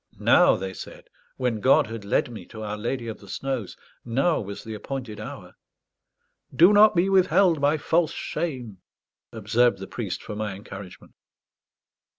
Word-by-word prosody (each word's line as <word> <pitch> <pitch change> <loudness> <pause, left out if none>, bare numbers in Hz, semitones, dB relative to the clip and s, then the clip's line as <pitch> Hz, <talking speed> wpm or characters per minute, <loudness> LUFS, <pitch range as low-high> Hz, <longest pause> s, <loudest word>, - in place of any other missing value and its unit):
Now, - - +5
they 95 0 -5
said, - - -11 0.3
when 125 -4 -1
God 130 +6 +4
had 115 -1 -7
led 100 +4 0
me 115 - -9
to 110 -1 -9
Our 105 0 -4
Lady 115 +3 -3
of 110 - -6
the 100 - -15
Snows, 130 -3 -4 0.3
now 135 +8 +1
was 100 -1 -7
the 110 - -7
appointed 115 -1 -6
hour. 105 - -9 1.0
"Do 175 +5 +6
not 210 0 +6
be 175 +2 +3
withheld 185 -4 +3
by 145 +2 +3
false 160 +1 +1
shame," 125 - -5 0.5
observed 115 +2 +2
the 95 - -7
priest, 95 -2 -5
for 105 - -7
my 105 -2 -3
encouragement. 100 -1 -11
115 Hz, 160 wpm, -25 LUFS, 105-140 Hz, 1.0 s, Do